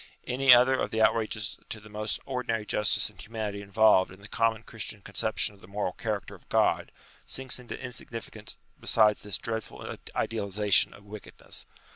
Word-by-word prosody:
Any 130 +1 +4
other 125 +2 +8
of 130 - 0
the 110 - -2
outrages 110 -1 +1
to 110 - -3
the 105 - -14
most 105 0 -2
ordinary 125 -5 -2
justice 105 -1 +2
and - - -14
humanity 105 -2 -4
involved 100 -1 +4
in 95 - -13
the 100 - -11
common 115 -1 +1
Christian 105 -3 -5
con 100 - -12
ception 105 +2 0
of 100 - -20
the - - -14
moral 100 -1 -2
character 105 0 -3
of - - -16
God, - - +2 0.4
sinks 130 -1 +1
inta 125 - -7
insignificance 115 -3 -8 0.2
beside 105 -2 +4
this 105 -2 -2
dreadful 110 -2 -4 0.2
idealization 105 -2 +2
of 100 - -16
wickedness. 105 0 -8
110 Hz, 170 wpm, -29 LUFS, 105-115 Hz, 0.4 s, other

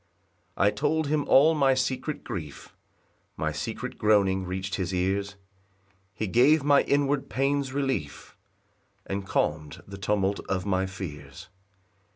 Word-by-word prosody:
3 95 - +3
I 105 - +4
told 155 +3 0
him 150 -1 0
all 155 +4 +6
my 135 -4 +3
secret 130 +3 -2
grief, 85 - -7 0.6
My - - -1
secret - - -5
groaning 100 -3 +3
reach'd 95 +1 -4
his 95 -2 -2
ears; 100 +2 -1 0.8
He 110 - -2
gave 135 +9 +4
my 145 -1 +5
inward 140 -1 0
pains 135 +2 0
relief, 130 - -3 0.7
And 95 0 -4
calm'd 75 -3 -2
the 100 0 -9
tumult 100 0 0
of 95 0 -1
my 95 -1 0
fears. 90 -2 -9
100 Hz, 135 wpm, -27 LUFS, 95-140 Hz, 0.8 s, all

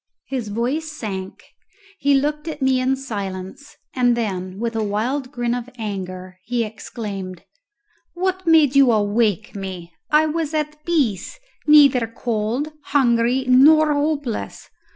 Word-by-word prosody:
His 255 -5 -4
voice 255 +9 -2
sank; 195 -9 -6 0.6
he 280 0 +3
looked 295 +3 -1
at 310 -2 -5
me 265 -1 +2
in 260 +1 +1
silence, 205 0 -7 0.2
and 245 -2 +2
then 185 -4 -3
with 230 +1 -3
a 220 - 0
wild 250 +6 -2
grin 240 -3 -1
of 245 0 -4
anger 185 -4 -6
he 235 +3 -1
exclaimed, 200 -4 -7 0.7
"What 375 0 -2
made 310 -4 +5
you 275 -3 +6
awake 210 -1 +1
me? 185 -3 -7 0.2
I 305 +1 +4
was 315 0 -2
at 300 0 -3
peace 280 - -1 0.3
neither 280 -6 +6
cold, 230 +6 -2
hungry, 250 -1 +2
nor 300 +4 +6
hopeless! 290 -5 -3
245 Hz, 130 wpm, -21 LUFS, 210-290 Hz, 0.7 s, you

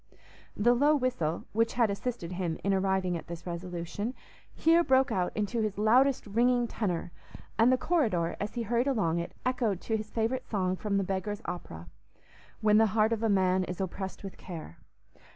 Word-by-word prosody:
The 240 +4 +4
low 290 +5 +4
whistle, 245 - -1
which 230 +1 +1
had 230 -4 +2
assisted 200 -4 -4
him 175 -3 -2
in 200 - +2
arriving 190 -2 +1
at 165 - -6
this 170 0 -8
resolution, 180 +6 -4 0.4
here 335 +1 +4
broke 265 -2 +3
out 180 -1 0
into 215 +2 0
his 215 -2 -2
loudest 250 +6 +3
ringing 240 +3 +2
tenor, 180 -7 -2 0.5
and 230 +3 +6
the 255 - +4
corridor, 220 - +1
as 205 +3 -4
he 235 - -1
hurried 235 +4 +1
along 195 -11 +1
it, 170 - -5
echoed 240 -7 0
to 225 - -1
his 215 0 -6
favourite 235 +4 -1
song 185 -3 0
from 200 +1 -1
the 195 - +1
Beggar's 195 +2 -3
Opera, 85 - -6 0.7
"When 210 0 +5
the 225 - +5
heart 215 +1 +4
of 225 - -2
a 225 - +1
man 185 -2 +3
is 180 +1 -6
oppressed 190 +1 -4
with 195 - -8
care." 160 - -9
210 Hz, 185 wpm, -29 LUFS, 185-240 Hz, 0.7 s, and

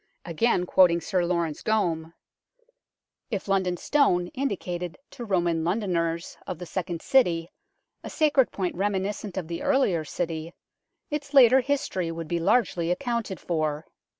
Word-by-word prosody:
Again 180 +2 +1
quoting 175 -2 +4
Sir 180 +1 0
Laurence 170 -3 -1
Gomme: 170 -7 -1 1.1
"If 205 -5 -3
London 190 -2 +1
Stone 180 - +2
indicated 180 -9 -3
to 245 - -8
Roman 175 -6 0
Londoners 170 -3 -1
of 180 - -4
the 180 - -7
second 175 -2 -4
city 175 -10 +2 0.5
a - - -6
sacred 295 -5 +2
point 185 -3 -2
reminiscent 200 +1 -2
of 180 -4 -3
the 170 +1 -5
earlier 265 - +2
city 165 +1 -4 0.6
its 290 -1 -4
later 260 -1 +8
history 250 -10 -1
would 165 -1 -6
be 170 +1 -1
largely 170 -3 +1
accounted 235 -1 -2
for. 155 -2 -2
180 Hz, 135 wpm, -26 LUFS, 170-220 Hz, 1.1 s, later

